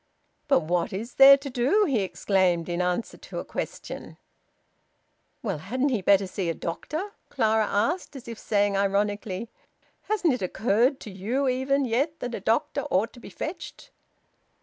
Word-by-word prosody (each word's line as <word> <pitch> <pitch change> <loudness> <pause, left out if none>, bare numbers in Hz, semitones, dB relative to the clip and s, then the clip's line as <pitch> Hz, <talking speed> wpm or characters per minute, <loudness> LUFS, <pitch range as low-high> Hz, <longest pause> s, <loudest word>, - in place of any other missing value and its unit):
"But 280 -10 +4
what 175 +5 -1
is 220 +6 -5
there 275 +1 +9
to 280 0 -7
do?" 275 - +3
he 270 - +1
exclaimed, 185 -3 +1
in 175 0 -1
answer 180 +5 -1
to - - -9
a - - -4
question. - - -6 1.3
"Well, 195 -9 -2
hadn't 255 - -1
he 235 -6 0
better 195 +1 +4
see 185 -1 -3
a 165 - -1
doctor?" 310 - -4 0.2
Clara 220 -1 +2
asked, 285 - -1
as 255 -3 -10
if 230 -2 -7
saying 205 -1 +1
ironically, 200 +1 -1 0.6
"Hasn't 375 -8 +2
it 250 - -3
occurred 230 - +1
to 210 - -8
you 230 +9 -1
even 265 +2 +1
yet 275 +7 0
that 245 -1 -4
a - - -3
doctor 220 +4 0
ought 200 +5 +1
to 245 - -13
be - - -11
fetched?" 325 +4 -7
225 Hz, 165 wpm, -26 LUFS, 195-270 Hz, 1.3 s, there